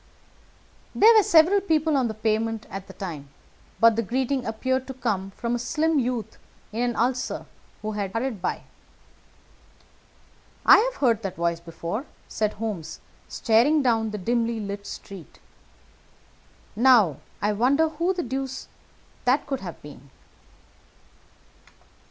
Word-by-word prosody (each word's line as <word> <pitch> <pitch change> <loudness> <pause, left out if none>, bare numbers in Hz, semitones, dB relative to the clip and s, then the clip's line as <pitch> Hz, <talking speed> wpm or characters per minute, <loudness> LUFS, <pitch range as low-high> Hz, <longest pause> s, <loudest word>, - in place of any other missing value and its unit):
There 450 +3 +7
were 435 - +8
several 385 0 +5
people 315 -4 +1
on 260 -3 +2
the 220 - -5
pavement 220 +1 -1
at 195 0 -7
the - - -11
time, 160 -8 -7 0.5
but 230 -1 +6
the 230 - +1
greeting 260 +3 -1
appeared 260 +4 -1
to 265 - -7
come 195 -6 -2
from 235 0 -2
a 240 - -1
slim 310 +5 +1
youth 245 -3 -3 0.3
in 225 +3 -3
an 245 -1 0
ulster 250 +2 -1 0.4
who 215 - -2
had 200 -2 -3
hurried 230 -2 -3
by. - - -2 2.0
"I've - - +6
heard 235 - +2
that 195 -4 -4
voice 170 0 -1
before," 170 - -5 0.2
said 215 -1 -1
Holmes 205 -7 -5 0.3
staring 250 +7 +3
down 225 -3 +2
the 210 - -5
dimly 230 +3 0
lighted 200 -1 -6
street. 190 -6 -10 1.4
"Now, 225 - +5 0.3
I 210 +1 +2
wonder 270 +9 +3
who 335 +4 0
the 360 -2 -2
deuce 265 +1 -4 0.6
that 260 +4 +2
could 270 -2 -3
have 175 -4 -8
been?" 140 -2 -13
230 Hz, 135 wpm, -25 LUFS, 205-265 Hz, 2.0 s, were